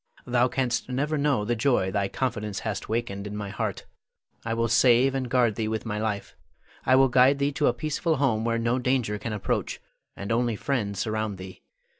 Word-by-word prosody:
Thou 125 0 +3
canst 125 -1 -1
never 145 +5 -1
know 140 -7 +1
the 120 +2 0
joy 110 -5 +1
thy 100 0 0
confidence 105 -5 -3
hath 105 -3 -4
wakened 105 -3 -2
in 105 - -6
my 105 -1 -4
heart. - - -3 0.6
I 115 0 -2
will 115 0 +1
save 120 +3 +4
and 130 -2 -2
guard 120 -3 +3
thee 110 +1 -2
with 110 +1 -3
my 105 -2 -3
life. 105 -2 -3 0.5
I 130 - +6
will 135 0 +6
guide 130 +2 +5
thee 140 +1 +1
to 135 - +1
a - - +3
peaceful 155 +5 -1
home 130 -6 +1
where 115 0 0
no 115 +2 0
danger 125 -5 0
can 110 +2 -4
approach, 105 -2 -2 0.4
and 100 +2 -5
only 120 0 +1
friends 105 -5 -2
surround 110 0 -2
thee. 95 0 -10
115 Hz, 200 wpm, -26 LUFS, 105-130 Hz, 0.6 s, I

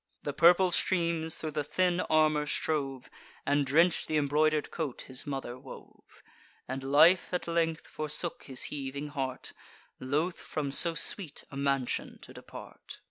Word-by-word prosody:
The 145 - -3
purple 175 +4 +5
streams 170 -3 +1
thro' 155 - -5
the 150 0 -2
thin 175 +4 +1
armour 155 -3 +2
strove, 135 -5 -2 0.4
And 145 0 +2
drench'd 165 +5 +3
th' 155 - 0
imbroider'd 150 +1 +1
coat 155 -7 -4
his 130 +1 -2
mother 135 -3 -5
wove; 130 0 -14 0.4
And 130 +1 -4
life 155 +7 +5
at 180 -1 -2
length 165 -1 0
forsook 155 +3 -3
his 130 -2 -1
heaving 140 +1 -5
heart, 135 -3 -4 0.5
Loth 150 +7 -1
from 145 -3 -4
so 165 +4 +3
sweet 165 -3 -4
a - - -9
mansion 140 -2 -1
to - - -12
depart. - - -11
150 Hz, 145 wpm, -30 LUFS, 140-165 Hz, 0.5 s, purple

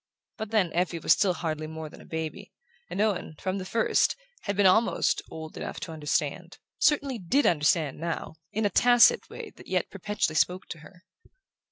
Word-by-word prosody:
But 220 -1 -5
then 205 -6 +1
Effie 175 0 0
was 165 - +4
still 185 -3 +1
hardly 155 -2 -3
more 160 0 -7
than - - -13
a - - -14
baby, 160 +5 -5 0.4
and 180 - -5
Owen, 205 -7 0
from 190 +1 -2
the 185 - -6
first, 225 +3 +2 0.3
had 200 -1 -2
been 205 - +4
almost 225 +5 +3
"old 160 0 -8
enough - - -5
to - - -5
understand": 155 +2 -2 0.2
certainly 280 -4 +2
DID 250 +11 +1
understand 150 -2 +2
now, 165 -1 -4
in 220 +1 -1
a 205 - +1
tacit 245 - +5
way - - -8
that - - -14
yet - - -1
perpetually 210 -6 -2
spoke 180 +4 +1
to 165 - -7
her. 180 +4 -16
180 Hz, 185 wpm, -27 LUFS, 160-210 Hz, 0.4 s, tacit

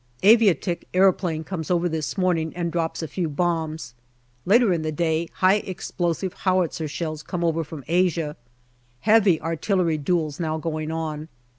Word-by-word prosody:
Aviatik 195 -5 +4
aeroplane 180 -4 +2
comes 160 -2 -5
over 175 -1 +2
this 160 +2 -3
morning 170 -4 +1
and 170 -1 -2
drops 165 -1 -2
a - - -3
few 170 0 -2
bombs. 160 -3 -2 0.5
Later 220 0 +5
in 165 - -1
the 155 0 -2
day 160 +1 0
high 190 +2 +4
explosive 180 -2 -3
howitzer 180 -4 0
shells 155 0 -4
come 175 +2 -4
over 165 -1 +1
from 150 -2 -9
Asia. 170 -3 +1 0.7
Heavy 210 -6 +4
artillery 165 0 0
duels 155 0 -1
now 160 -2 -1
going 155 -1 -3
on. 160 -1 -4
165 Hz, 150 wpm, -24 LUFS, 155-185 Hz, 0.7 s, Later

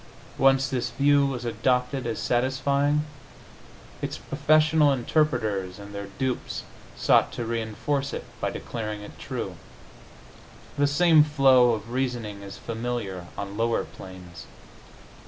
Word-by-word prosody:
Once 135 0 +4
this 125 -2 -2
view 140 +3 +3
was 125 -3 -4
adopted 125 +3 0
as 115 -2 -2
satisfying, 140 +4 +1 1.0
its - - -3
professional 155 -1 +3
interpreters 120 - 0
and 100 0 -10
their 100 0 -5
dupes 130 -2 -2 0.3
sought - - +4
to 120 - -4
reinforce 115 +5 -2
it - - -5 0.2
by - - 0
declaring 105 -3 -5
it 105 - -11
true. - - -5 1.2
The 145 0 +3
same 160 +1 +5
flow 135 -5 +5
of 110 +1 -5
reasoning 120 -6 -2
is 100 0 -9
familiar 115 -6 -4
on 100 0 -5
lower 115 +1 +1
planes. 90 -2 -11
120 Hz, 120 wpm, -26 LUFS, 110-140 Hz, 1.2 s, same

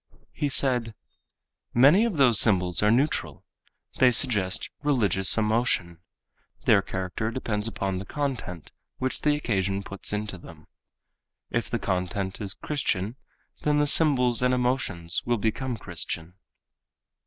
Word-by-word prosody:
He 145 - -2
said, 125 -5 +2 0.8
"Many 145 - +6
of 215 -9 -2
those 125 -7 +5
symbols 90 -5 +3
are 105 - +3
neutral. 130 +7 0 0.5
They 130 - +6
suggest 105 -6 +1
religious 115 -11 +3
emotion. 105 -6 0 0.7
Their 100 - +5
character 95 +4 -4
depends 115 -3 -2
upon 95 -4 -3
the 100 - -7
content 125 - -5 0.3
which 130 0 -3
the 150 -1 +2
occasion 100 -8 -1
puts 100 0 -6
into 105 -3 -4
them. 80 -3 -14 0.9
If 120 - -1
the 120 - -1
content 95 -1 -3
is 100 -1 -4
Christian 115 -7 -2 0.5
then 150 0 +1
the 150 - +3
symbols 130 -6 +3
and 125 0 +2
emotions 125 -9 -1
will 120 0 +2
become 115 +4 -2
Christian." 85 -2 -5
110 Hz, 130 wpm, -26 LUFS, 95-130 Hz, 0.9 s, Many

